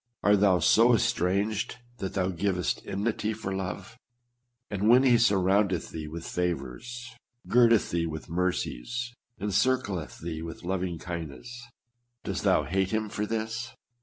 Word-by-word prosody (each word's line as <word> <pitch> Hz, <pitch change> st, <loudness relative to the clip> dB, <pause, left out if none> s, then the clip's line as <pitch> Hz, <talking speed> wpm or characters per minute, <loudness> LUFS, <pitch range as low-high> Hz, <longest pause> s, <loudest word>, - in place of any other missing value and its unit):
Art 105 Hz, 0 st, +5 dB
thou 95 Hz, -2 st, +5 dB
so 115 Hz, +6 st, +5 dB
estranged 105 Hz, -1 st, 0 dB, 0.2 s
that 95 Hz, -, -4 dB
thou 95 Hz, -1 st, +1 dB
givest 90 Hz, -1 st, -1 dB
enmity 105 Hz, +2 st, -1 dB
for 100 Hz, -3 st, -4 dB
love? 95 Hz, +4 st, -5 dB, 0.7 s
And 105 Hz, +1 st, +1 dB
when 125 Hz, +3 st, +7 dB
he 125 Hz, -3 st, +5 dB
sur 110 Hz, -4 st, +4 dB
roundeth 95 Hz, -1 st, +1 dB
thee 80 Hz, -2 st, -5 dB
with 80 Hz, +2 st, -7 dB
favors, 90 Hz, -, -4 dB, 0.3 s
girdeth 115 Hz, -2 st, +4 dB
thee 85 Hz, -1 st, 0 dB
with 80 Hz, -1 st, -6 dB
mercies, 90 Hz, -, -2 dB, 0.3 s
encircleth 100 Hz, -4 st, 0 dB
thee 80 Hz, -1 st, -5 dB
with 80 Hz, +1 st, -7 dB
loving 90 Hz, -1 st, -2 dB
kindness, 85 Hz, -, -7 dB, 0.6 s
dost -, -, -3 dB
thou -, -, +4 dB
hate 95 Hz, +1 st, 0 dB
him 110 Hz, 0 st, -1 dB
for 105 Hz, +1 st, -3 dB
this 115 Hz, +2 st, -3 dB
100 Hz, 140 wpm, -28 LUFS, 90-115 Hz, 0.7 s, when